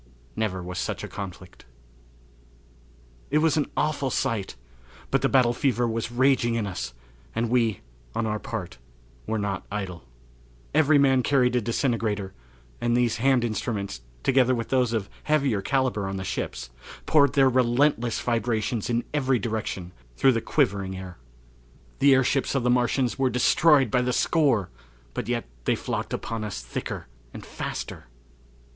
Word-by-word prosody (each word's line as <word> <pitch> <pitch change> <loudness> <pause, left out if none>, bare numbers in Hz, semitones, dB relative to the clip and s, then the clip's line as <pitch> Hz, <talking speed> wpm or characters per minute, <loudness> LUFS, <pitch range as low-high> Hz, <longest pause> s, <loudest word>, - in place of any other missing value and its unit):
Never 95 -5 -2
Was 90 0 -5
Such - - -3
a - - -4
Conflict. 95 -5 -9 1.6
It 150 - +2
was 155 -1 +3
an 150 -3 0
awful 145 -3 0
sight; 110 -5 -1 0.6
but - - +2
the - - +2
battle 125 -3 +4
fever 120 -2 +1
was 115 0 -2
raging 125 -1 +3
in 115 -2 0
us, 90 -10 -5 0.4
and 115 +1 -1
we, 115 -5 +2 0.3
on 115 - 0
our 105 -1 -1
part, 110 - -6 0.5
were 110 - 0
not 100 -2 -3
idle. 95 -5 -4 0.7
Every 155 0 +5
man 135 -2 +4
carried 125 -1 +2
a 125 - +2
disintegrator, 110 -4 -1 0.5
and 120 0 +2
these 120 -2 +1
hand 130 +1 +3
instruments, 105 - -3 0.2
together 130 -1 +4
with 115 -1 -4
those 125 -3 +2
of 110 -4 -1 0.2
heavier 140 -9 +2
calibre 120 -4 0
on 95 - -4
the 95 - -4
ships - - -4 0.3
poured 140 -4 +4
their 135 -2 +5
resistless 125 -1 +2
vibrations 115 -2 -1
in 120 0 +1
every 135 -3 +2
direction 110 -5 -3 0.3
through 135 - +5
the 115 -2 0
quivering 95 -2 0
air. 90 -2 -9 0.8
The 140 -1 +6
airships 135 +1 +1
of 135 - +1
the 125 - +3
Martians 125 +1 +1
were 135 -1 +3
destroyed 135 +1 +4
by 125 - +3
the 125 0 0
score, 125 - +2 0.4
but - - -4
yet 120 -1 -1 0.2
they - - +2
flocked - - -4
upon 115 -1 -3
us 100 - -5
thicker - - -5 0.3
and - - -8
faster. - - -6
120 Hz, 155 wpm, -26 LUFS, 105-130 Hz, 1.6 s, The